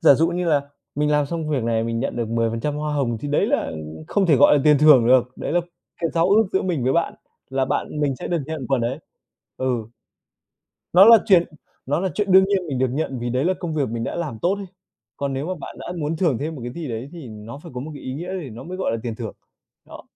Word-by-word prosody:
giả 140 - +7
dụ 165 +4 +2
như 175 0 -2
là 150 -3 +3 0.3
mình 150 +1 +1
làm 150 -1 +2
xong 160 0 -4
việc 135 -6 0
này 115 -1 +1
mình 115 0 -2
nhận 135 - -3
được 115 -2 -2
10% 115 +5 -1
hoa 150 0 -2
hồng 120 -6 0
thì 145 - -4
đấy 145 - +2
là - - 0 0.4
không 200 -2 +2
thể 150 -5 +5
gọi - - +6
là - - +2
tiền 150 -2 +6
thưởng 145 -6 +7
được. 125 0 +4
Đấy - - -4
là 175 - +3 0.4
cái 165 -2 0
giao 170 +1 +2
ước 215 +3 +5
giữa 190 - +2
mình 165 -9 -1
với 130 - +2
bạn, 170 0 0 0.4
là 135 0 +1
bạn 150 +3 -2
mình 140 -3 0
sẽ - - -6
được 175 - 0
nhận 155 -5 -5
phần 135 -3 +2
ấy. 120 +4 -2 0.6
Ừ. 125 -4 -1 1.1
Nó 185 +3 +8
là 230 +1 +9
chuyện 185 -5 +6 0.4
nó 145 +4 0
là 190 - 0
chuyện 205 -3 0
đương 190 +1 +8
nhiên 200 -1 +3
mình 135 - -2
được 130 0 +2
nhận 135 -2 -2
vì 120 0 -3
đấy 130 +3 0
là 185 +2 +2
công 165 -3 -3
việc 140 -3 0
mình 115 +1 -3
đã - - -4
làm 155 -10 -4
tốt 180 +3 +2
ấy. 200 -1 -7 0.5
Còn 140 -1 -2
nếu 135 +3 -3
mà 185 - -2
bạn - - -8
đã 175 - -6
muốn 155 +1 -2
thưởng 160 -8 +1
thêm 155 +3 -3
một 140 - -8
cái 120 - -5
gì 160 +1 -6
đấy 120 +3 -5
thì 165 -7 -9
nó 110 +4 -9
phải 170 - -11
có 125 - -4
một 155 +4 -6
cái 145 - -10
ý 130 - -5
nghĩa 175 +5 -5
thì 140 - -8
nó 115 +2 -9
mới 185 +2 -6
gọi 190 - -1
là 115 - -1
tiền 115 -3 -4
thưởng. 115 -3 -5 0.5
Đó. - - -12
145 Hz, 275 wpm, -22 LUFS, 125-170 Hz, 1.1 s, là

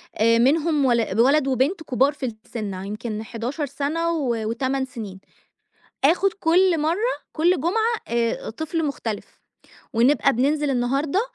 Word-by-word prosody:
آآ، 230 +1 +4
منهم 295 +3 +2
ول 230 -4 +1
ولد 275 +4 +4
وبنت 275 - 0
كبار 270 0 +2
في 290 - -5 0.2
السن 210 -4 -5
يمكن 215 +1 -5
11 245 +7 -4
سنة 290 +5 -2
و 275 -7 0 0.2
و8 265 +3 -1
سنين، 215 -7 -8 0.8
آخد 360 +6 +3
كل 360 -1 +3
مرَّة 355 +11 0 0.2
كل 340 0 +2
جمعة 445 +8 +1
آآ، 235 0 -1
طفل 315 +6 -3
مختلف، 230 -7 -5 0.5
ونبقى 270 +4 +3
بننزل 285 +4 +1
النهاردة 275 +8 0
275 Hz, 130 wpm, -23 LUFS, 235-320 Hz, 0.8 s, آآ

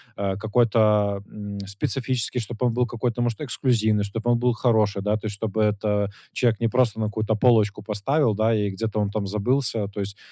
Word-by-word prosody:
а, 100 -1 -2
какой-то, 105 -2 +2
м, 100 -1 -7
специфический, 125 +4 -1
чтобы 120 +2 -3
он 115 - 0
был 125 0 +1
какой-то 120 0 -2
может 120 +3 -1
эксклюзивный, 110 -6 +1
чтобы 115 +4 -1
он 120 - +2
был 125 0 +2
хороший, 110 -5 +1
да. 105 +1 +1
То 110 - -6
есть, 105 - -5
чтобы 110 +1 -2
это, 105 -1 0 0.2
человек 115 -3 +1
не 115 - +2
просто 125 -3 +1
на 110 - 0
какую-то 110 +1 -1
полочку 105 -3 +3
поставил, 110 +4 +1
да, 110 +1 +2
и 105 -1 0
где-то 110 +2 -3
он 105 -1 0
там 100 -1 -3
забылся. 110 0 0
То 100 - -8
есть 100 0 -4
110 Hz, 200 wpm, -24 LUFS, 105-120 Hz, 0.2 s, полочку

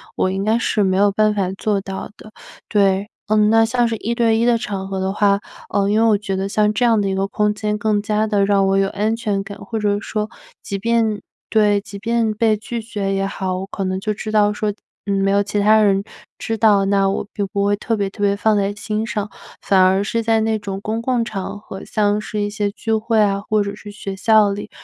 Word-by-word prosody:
我 185 - +1
应 195 +1 -2
该 220 +2 +2
是 215 -3 +1
没 190 -1 +1
有 200 +1 +4
办 215 +1 +2
法 195 -3 -1
做 205 -2 0
到 195 +1 -6
的。 215 - -14 0.4
对， 200 0 +2 0.2
呃， 215 - +2
那 220 +1 +4
像 240 +1 +1
是 230 - -2
1 225 +2 -3
对 230 -2 +2
1 230 - +2
的 240 -1 +4
场 195 -3 -4
合 195 -1 -3
的 190 0 -1
话， 200 -1 +2 0.3
啊， 200 0 +1
因 215 +2 +2
为 230 - +4
我 215 - +4
觉 195 -2 -3
得 195 +1 -2
像 210 +1 +2
这 235 +3 +1
样 225 -3 +3
的 195 - 0
一 190 - -1
个 195 - 0
空 210 +1 +1
间 210 0 -2
更 210 -1 +1
加 215 +1 0
的 205 -2 +2
让 195 -1 +3
我 195 - +2
有 195 0 +2
安 215 +3 -1
全 210 -4 -1
感。 200 0 -9
或 225 -2 -5
者 205 -1 +1
说 215 0 -3 0.3
即 200 - -4
便 220 0 0 0.3
对， 210 -2 +3
即 200 0 -10
便 230 +1 0
被 215 0 +2
拒 230 +2 -5
绝 200 -3 -3
也 195 - 0
好， 190 -2 -3
我 190 - -4
可 200 - -4
能 185 0 -2
就 215 +2 -2
知 215 +1 -6
道 210 -1 +3
说， 210 0 -1 0.3
呃， 200 - -1
没 195 0 +1
有 200 0 +3
其 205 0 -2
他 215 +1 +5
人 195 -1 +3 0.3
知 225 - -3
道， 205 -3 +4
那 195 -1 +2
我 195 - -2 0.3
不 200 -2 0
会 205 - +2
特 225 +3 -2
别 200 - 0
特 205 - -11
别 200 0 +2
放 215 +1 +2
在 200 0 +1
心 215 +2 -3
上， 210 -2 -2 0.3
反 190 -2 +3
而 190 +2 +4
是 230 +2 -1
在 225 -1 +2
那 220 -1 0
种 195 -1 -5
公 220 +2 -3
共 240 -1 0
场 200 -2 -5
合， 195 -2 -9
像 210 -1 +1
是 210 0 -5
一 205 - -1
些 205 -1 -1
聚 220 +2 -3
会 220 +1 +1
啊 200 -1 +2
或 215 -1 +2
者 200 0 -5
是 210 0 -11
学 200 -1 -6
校 210 +1 +4
里， 200 +1 -5
210 Hz, 260 characters per minute, -20 LUFS, 195-220 Hz, 0.4 s, 他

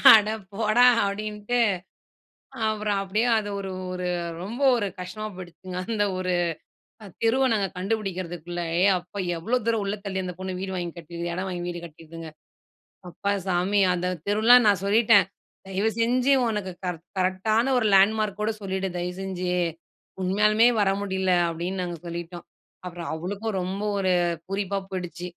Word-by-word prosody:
அட 210 -1 +4 0.2
போடா 220 +3 +4 0.2
அப்டின்ட்டு, 210 +3 -2 1.1
அப்புறம் 210 -2 0
அப்டியே 210 +4 0
அது 205 -1 -2
ஒரு, 195 -1 -5 0.2
ஒரு 180 0 -3 0.4
ரொம்ப 235 +8 -6
ஒரு 210 -4 0
கஷ்டமா 215 +4 -5
போயிடுச்சுங்க. 180 0 -9
அந்த 215 -2 +1
ஒரு 185 -1 -1 0.9
தெருவ 260 +4 +3
நாங்க 200 -2 +1
கண்டுபிடிக்குறதுக்குள்ள. 180 -4 -3 0.2
ஏ! - - +4
அப்பா 180 +3 -10 0.2
எவ்ளோ 225 +10 0
தூரம் 225 -2 +1
உள்ள 200 +1 -2
தள்ளி 190 -1 -2
அந்த 180 -1 -5
பொண்ணு 185 -1 -4
வீடு 190 0 -4
வாங்கி 175 -2 -4
கட்டியிருக்கு 170 +1 -5
இடம் 185 +2 -3
வாங்கி 175 -2 -4
வீடு 175 -1 -5
கட்டியிருக்குங்க. 165 0 -10 0.8
அப்பா 200 +4 -2
சாமி 190 +3 +2
அந்த 180 0 -2 0.2
தெருவுலாம் 225 +3 +6
நான் 195 -3 +3
சொல்லிட்டேன், 215 0 +5 0.4
தயவு 200 +4 0
செஞ்சு 250 +4 +3 0.2
உனக்கு 205 -4 -2
கர் 180 -2 -2 0.2
கரெக்டான 215 +7 +1
ஒரு 220 - +1
லேண்ட்மார்க் 210 +1 +3
ஓட 215 - +1
சொல்லிடு 190 0 -2
தயவுசெஞ்சு. 180 0 -3 0.7
உண்மயாலுமே 210 +4 +4
வர 195 -1 +3
முடியல 190 -2 0 0.2
அப்டின்னு 175 +3 -3
நாங்க 175 -1 -4
சொல்லிட்டோம். 170 0 -6 0.4
அப்புறம் 175 -1 -6
அவளுக்கும் 195 +5 -3
ரொம்ப 190 +3 -3 0.2
ஒரு 185 -2 +2 0.3
பூரிப்பா 195 0 -1
போயிடுச்சு. 175 -2 -5
195 Hz, 140 wpm, -25 LUFS, 180-215 Hz, 1.1 s, தெருவுலாம்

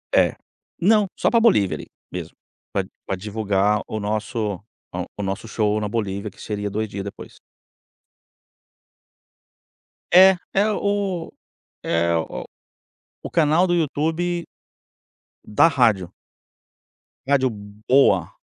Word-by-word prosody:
É, - - +4 0.5
não, 210 +3 +5
só - - +2
para 230 - +4
Bolívia 105 - +3
ali - - -10 0.2
mesmo, - - -6 0.4
pra - - +1 0.2
pra 95 - -2
divulgar 105 +1 0
o 110 - -4
nosso, 105 +1 -2 0.4
ah, - - -3
o - - -3
nosso 95 +3 -4
show 105 -1 0
na 105 - -2
Bolívia 105 -1 -3
que - - -16
seria 105 -1 -3
2 110 +2 -2
dias 100 -1 -5
depois. 100 - -10 2.7
É, 185 +1 +8 0.2
é 200 +2 +3
o 200 -5 -1 0.5
é 85 0 +1
o 80 - -3 0.8
o - - -6
canal 165 +2 +3
do 175 - +1
YouTube, 165 +2 -1 1.0
da 105 +9 +4
rádio. 110 - +2 1.2
Rádio 135 -2 +3 0.4
Boa, 100 - +4
110 Hz, 115 wpm, -22 LUFS, 100-170 Hz, 2.7 s, É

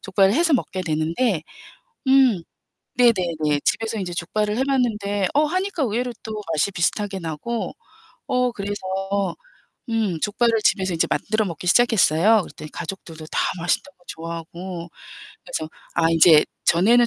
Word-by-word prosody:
족발을 195 +1 +2
해서 330 +2 +3
먹게 190 -7 0
되는데 165 +4 0 0.7
음. 260 -9 +5 0.5
네네네. 170 -11 +2
집에서 225 -1 0
이제 180 -2 -4
족발을 210 +5 -1
해 265 - +2
봤는데 210 -7 0
어 300 +1 +4
하니까 370 +1 -1
의외로 245 +2 -1
또 215 -1 -5
맛이 160 +6 +1
비슷하게 190 +2 -1
나고. 165 +9 -4 0.6
어 250 0 +1
그래서 205 -2 -4 1.2
음 215 -8 0
족발을 225 +2 +2
집에서 190 -2 +2
이제 165 - +1
만들어 215 0 0
먹기 170 0 -6
시작했어요. 210 -1 +4
그랬더니 150 0 -10
가족들도 165 -3 -7
다 - - 0 0.2
맛있다고 175 +11 -2
좋아하고. 170 +2 -7 0.6
그래서 160 -12 -4 0.2
아 165 -1 +3
인제 165 -1 +7 0.2
전에는 230 +8 +5
200 Hz, 320 characters per minute, -22 LUFS, 170-235 Hz, 1.2 s, 인제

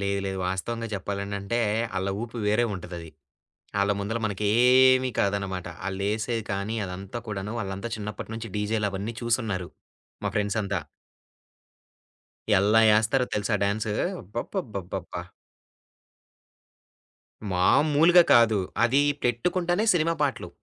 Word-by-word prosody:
లేదు, 100 0 0
లేదు. 95 0 -3
వాస్తవంగా 115 +5 -3
చెప్పాలనంటే, 100 +2 -3 0.4
ఆళ్ళ 95 +1 -1
ఊపు 120 0 -7
వేరే 105 +3 +3
ఉంటదది. 85 -3 -8 0.7
ఆళ్ళ 100 +1 +2
ముందర 105 +3 -2
మనకు 105 -1 -3 0.2
ఏమి 130 0 +6
కాదు 100 0 +2
అన్నమాట. 95 -2 -5 0.2
ఆళ్ళేసేది 110 +4 -2
కానీ, 100 +3 -2
అదంతా 95 +5 -6
కూడాను, 105 0 -4
వాళ్ళంతా 100 +2 -4
చిన్నప్పటి 105 +1 -6
నుంచి 115 -1 -6
డీజేలవన్నీ 105 0 -1
చూసి 120 +1 +1
ఉన్నారు, 95 -4 -3 0.5
మా - - 0
ఫ్రెండ్స్ 105 0 0
అంతా. 100 -2 -1 1.8
ఎలా 105 +3 +4
వేస్తారో 110 +4 +3
తెలుసా 105 +1 0
డాన్స్! 105 +2 0 0.3
అబ్బబ్బబ్బబ్బబ్బా! 105 - -5 2.3
మామూలుగా 155 - +5
కాదు. 115 -3 +5 0.3
అది 135 +4 +4 0.2
పెట్టుకుంటేనే 175 - +1
సినిమా 165 -1 +2
పాటలు. 140 -2 -1
105 Hz, 110 wpm, -26 LUFS, 100-120 Hz, 2.3 s, ఏమి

